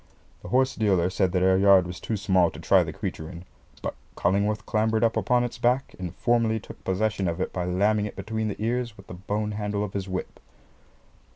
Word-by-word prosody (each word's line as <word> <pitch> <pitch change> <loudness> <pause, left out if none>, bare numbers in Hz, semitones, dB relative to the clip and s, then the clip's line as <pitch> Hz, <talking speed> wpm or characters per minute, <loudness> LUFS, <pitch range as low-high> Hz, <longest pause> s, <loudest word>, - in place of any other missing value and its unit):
The - - -9
horse 130 +1 +2
dealer 95 -5 +2
said 95 -1 +1
that 90 0 +1
our 95 0 +4
yard 95 -2 +6
was 90 +1 -7
too 110 - -3
small 95 -3 +3
to - - -11
try - - +4
the - - -5
creature 80 - -5
in; 90 0 -10 0.4
but - - -2 0.2
Cullingworth 105 +2 +1
clambered 110 +1 +1
up 115 -1 +2
upon 125 0 +2
its 120 0 -5
back 125 +3 +1
and 90 -3 -5
formally 115 -2 +2
took - - -13
possession 100 0 0
of 85 +1 -2
it 95 - -2
by 90 -1 -2
lamming 105 +4 +1
it - - -9
between 110 +3 -3
the 105 - -4
ears 120 0 -2
with 95 - -13
the - - -9
bone 105 +4 -3
handle 105 -1 -2
of 105 - -5
his 95 -1 -4
whip. 95 0 -5
100 Hz, 215 wpm, -26 LUFS, 95-110 Hz, 0.4 s, yard